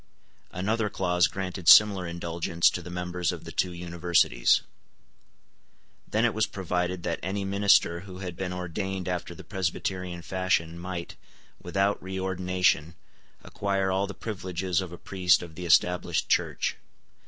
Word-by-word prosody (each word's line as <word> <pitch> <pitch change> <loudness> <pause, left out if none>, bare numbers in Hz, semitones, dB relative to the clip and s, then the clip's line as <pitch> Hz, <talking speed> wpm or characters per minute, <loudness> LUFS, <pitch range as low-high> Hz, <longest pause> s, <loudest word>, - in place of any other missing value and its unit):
Another 105 +4 -1
clause 90 -3 +2
granted 95 -3 -5
similar 100 -4 +7
indulgence 85 0 +1
to 90 - -4
the 90 - -9
members 90 0 -2
of - - -7
the - - -8
two 90 - 0
universities. 85 -7 +2 1.5
Then 110 +2 +1
it 120 - +2
was 110 0 +1
provided 90 -2 -2
that 85 -1 -2
any 95 +2 -3
minister 100 -3 +3
who 95 0 -10
had 90 -2 -6
been 90 0 -4
ordained 90 +1 -4
after 90 -1 -3
the - - -11
Presbyterian 90 -2 -3
fashion 85 -3 -1
might, 90 -1 -6 0.4
without 95 +3 0
reordination, 90 -3 0 0.5
acquire 100 -1 -1
all 95 +1 0
the 105 - -8
privileges 95 -4 -2
of 90 -2 -6
a 85 - -8
priest 90 -1 +2
of 85 -2 -10
the 90 +2 -6
Established 90 -1 +2
Church. - - 0
90 Hz, 140 wpm, -27 LUFS, 85-95 Hz, 1.5 s, similar